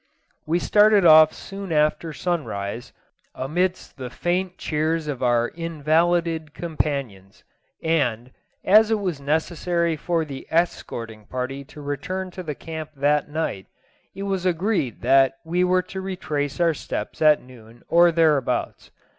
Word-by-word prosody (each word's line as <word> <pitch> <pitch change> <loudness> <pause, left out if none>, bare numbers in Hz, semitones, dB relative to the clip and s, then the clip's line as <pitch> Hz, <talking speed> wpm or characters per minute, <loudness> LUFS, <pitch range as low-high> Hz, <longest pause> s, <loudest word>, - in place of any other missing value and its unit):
We 165 +2 +2
started 210 +1 +4
off 155 -1 +8
soon 195 -2 -8
after 155 +1 +1
sun 175 +1 -2
rise, 100 +3 -5 0.4
amidst 180 +8 -2
the 130 -2 -6
faint 180 +6 -2
cheers 155 +1 -1
of 140 -4 -4
our 120 -1 +2
invalided 165 0 0
companions, 140 - -4 0.4
and, 130 -7 0 0.3
as 215 +2 +6
it 220 - +2
was 180 -8 -3
necessary 165 +3 0
for 165 +1 -1
the 135 -3 -8
escorting 115 -10 -2
party 130 +2 -4
to 150 - -12
return 185 +6 -4
to 185 - -7
the 155 -5 -5
camp 160 0 -7
that 145 +2 +1
night, 150 -11 -3 0.5
it 195 - -5
was 195 -2 -2
agreed 180 - 0
that 135 -1 +4
we 175 +2 +1
were 180 0 +2
to 190 +1 -7
retrace 155 -7 -3
our 170 -1 +3
steps - - -6
at 155 -1 +5
noon 120 -2 -16
or 170 +1 +5
thereabouts. 155 -5 +1
160 Hz, 140 wpm, -23 LUFS, 140-175 Hz, 0.5 s, off